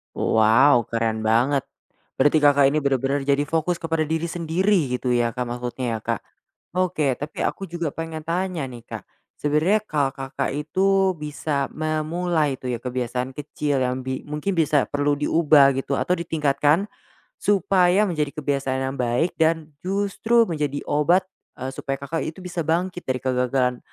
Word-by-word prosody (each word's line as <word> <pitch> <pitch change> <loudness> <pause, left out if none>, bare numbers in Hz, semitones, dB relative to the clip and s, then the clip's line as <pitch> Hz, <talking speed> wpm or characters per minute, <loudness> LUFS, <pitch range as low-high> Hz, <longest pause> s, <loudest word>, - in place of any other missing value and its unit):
Wow 115 +3 +4
keren 110 -1 -1
banget, 125 +5 +2 0.5
berarti 145 +3 +4
Kakak 145 -2 +5
ini 150 - 0
benar-benar 140 -1 0
jadi 140 0 +2
fokus 165 +2 0
kepada 165 -1 0
diri 160 +2 -2
sendiri 170 -3 +1
gitu 125 - -3
ya, 120 -1 +1
Kak, 125 - -4
maksudnya 120 -1 -3
ya, - - -8
Kak. - - -1 0.5
Oke, 175 -7 +1
tapi 145 +4 -5
aku 195 -3 -4
juga 170 -4 -3
pengen 165 0 -5
tanya 175 -3 -1
nih, 120 -2 -10
Kak, - - -9 0.3
sebenarnya 155 +8 +2
kalau 145 -6 0
Kakak 135 0 -3
itu 190 +5 +2
bisa 150 -2 -3
memulai 155 0 -1
itu - - -9
ya, 120 - -2
kebiasaan 125 0 -3
kecil 145 -1 -2
yang 130 +1 -1
bi 130 0 -4
mungkin 150 +6 -2
bisa 150 -3 +3
perlu 145 0 +1
diubah 150 -1 +4
gitu, 135 +1 -2
atau 180 - +1
ditingkatkan, 150 +1 +1 0.5
supaya 190 -1 +3
menjadi 150 -5 -1
kebiasaan 140 -3 -1
yang 135 +1 -3
baik 125 +7 +1
dan 160 -1 +1
justru 205 +5 +1
menjadi 150 -4 -2
obat, 165 +6 +3 0.4
eee, 130 - -3
supaya 135 0 -4
Kakak 155 +4 -2
itu 160 - -7
bisa 180 -1 -3
bangkit 175 +2 -1
dari 130 -1 -1
kegagalan, 125 -1 +1
150 Hz, 155 wpm, -23 LUFS, 130-165 Hz, 0.5 s, Kakak